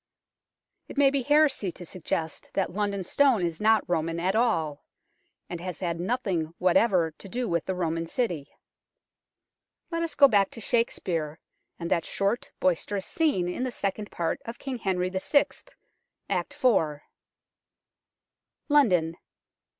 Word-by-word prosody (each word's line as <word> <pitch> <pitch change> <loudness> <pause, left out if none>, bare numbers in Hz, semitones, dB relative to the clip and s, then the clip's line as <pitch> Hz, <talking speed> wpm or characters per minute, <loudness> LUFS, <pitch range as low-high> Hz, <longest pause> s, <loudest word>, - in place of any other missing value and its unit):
It - - -10
may 280 -1 +5
be 280 -1 +1
heresy 285 - +3
to 175 - -10
suggest 160 -2 -4
that 190 -2 0
London 200 0 -1
Stone 250 -3 +3
is 165 +1 -4
not 220 -1 +4
Roman 165 -1 -1
at 185 +3 +1
all, 165 -11 +1 0.6
and 175 -1 -6
has 180 -1 -5
had 170 -2 -2
nothing 180 -6 -1
whatever 180 -2 +3
to 190 +5 -13
do 245 +3 -2
with 170 -2 0
the 190 - -2
Roman 165 -2 -1
city. 170 - -2 1.4
Let 335 0 -1
us 330 -3 -2
go 280 - +8
back 200 -5 +3
to - - -9
Shakespeare, 175 -9 -1 0.4
and 170 -1 -5
that 165 - +2
short, 200 +4 -1
boisterous 185 +2 0
scene 290 - +1
in 180 - -3
the 255 - 0
Second 205 -2 -3
Part 170 -1 -2
of 230 +1 -7
King 265 -3 -5
Henry 185 -3 0
VI., 190 +10 +3 0.8
Act - - -2
iv. 155 -11 +3 1.7
London. 180 - +3
190 Hz, 140 wpm, -27 LUFS, 170-235 Hz, 1.7 s, go